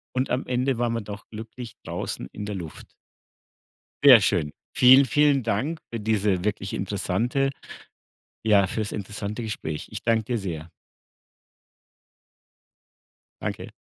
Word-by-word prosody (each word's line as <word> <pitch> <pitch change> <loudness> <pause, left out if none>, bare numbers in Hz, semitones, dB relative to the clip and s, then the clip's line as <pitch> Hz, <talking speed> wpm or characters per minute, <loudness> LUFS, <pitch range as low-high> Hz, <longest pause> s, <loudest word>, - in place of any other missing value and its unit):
und 130 +1 0
am 125 +2 -1
Ende 125 0 0
waren 120 -1 +1
wir 115 - -1
doch 100 0 -9
glücklich 115 +2 -9
draußen - - -4
in 105 - -6
der 105 0 -4
Luft. 85 -5 -8 1.1
Sehr 130 -5 +10
schön. 75 -5 +1 0.2
Vielen, 130 +2 +8
vielen 145 +1 +3
Dank 125 +9 -1
für 115 - -3
diese 105 -3 +1
wirklich 100 -1 -2
interessante 105 +8 0 0.9
ja, 105 -3 +4
fürs 105 +2 -3
interessante 105 +2 -5
Gespräch. 90 -9 -4
Ich - - -6
danke 115 -1 +2
dir 120 +2 -1
sehr. 85 -5 -5 2.7
Danke. - - -4
110 Hz, 125 wpm, -25 LUFS, 100-125 Hz, 2.7 s, Sehr